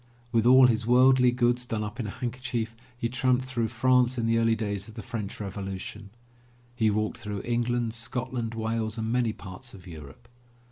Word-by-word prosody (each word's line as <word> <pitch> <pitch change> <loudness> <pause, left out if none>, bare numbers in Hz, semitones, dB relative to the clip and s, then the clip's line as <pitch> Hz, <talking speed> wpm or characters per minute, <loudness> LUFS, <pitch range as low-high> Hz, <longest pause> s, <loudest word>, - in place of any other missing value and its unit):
With 115 -1 +3
all 130 +1 +8
his 115 -2 +2
worldly 125 +1 +6
goods 120 0 +1
done 110 -3 -3
up 105 +4 -6
in 115 - -2
a - - -4
handkerchief, 120 -1 -4 0.2
he 120 - -1
tramped 130 +1 +1
through 120 -3 -1
France 125 +2 +3
in 115 - 0
the 115 0 +3
early 115 0 +3
days 100 -2 -3
of 110 - -12
the 115 - -7
French 115 -5 -5
Revolution; 100 +1 -6 0.7
he 110 -3 +3
walked 110 +1 -1
through 105 -2 -5
England, 120 -1 0
Scotland, 115 0 -3
Wales 110 0 -2
and 110 0 -2
many 120 -2 +2
parts 100 +5 -10
of 90 -2 -14
Europe. 80 +5 -11
115 Hz, 185 wpm, -27 LUFS, 110-125 Hz, 0.7 s, all